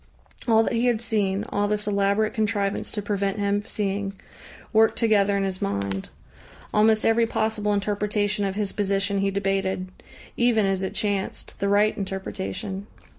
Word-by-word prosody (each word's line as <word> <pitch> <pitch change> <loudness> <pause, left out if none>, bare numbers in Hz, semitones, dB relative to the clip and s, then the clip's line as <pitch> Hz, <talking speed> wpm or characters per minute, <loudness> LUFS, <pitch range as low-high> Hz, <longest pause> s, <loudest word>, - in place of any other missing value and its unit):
All 225 -1 +5
that - - -1
he 235 +2 +2
had 235 -3 +2
seen, 210 -3 0
all 205 0 0
this 210 0 -1
elaborate 200 +1 +1
contrivance 205 -2 -1
to 210 - -3
prevent 200 -1 -1
him 205 0 0
seeing, 200 -1 -2 0.6
worked 220 0 +4
together 205 -3 +3
in 195 - 0
his 190 -1 -3
mind. 100 -1 -2 0.6
Almost 215 +1 +4
every 225 0 +4
possible 220 -2 0
interpretation 205 0 0
of 195 -1 -1
his 205 -1 -1
position 200 0 0
he 195 0 +1
debated 195 -1 -1 0.5
even 235 -3 +3
as 195 -1 +1
it 190 - -3
chanced, 200 -2 -3
the 200 - 0
right 205 +1 +3
interpretation. 190 - -4
205 Hz, 155 wpm, -25 LUFS, 195-215 Hz, 0.6 s, All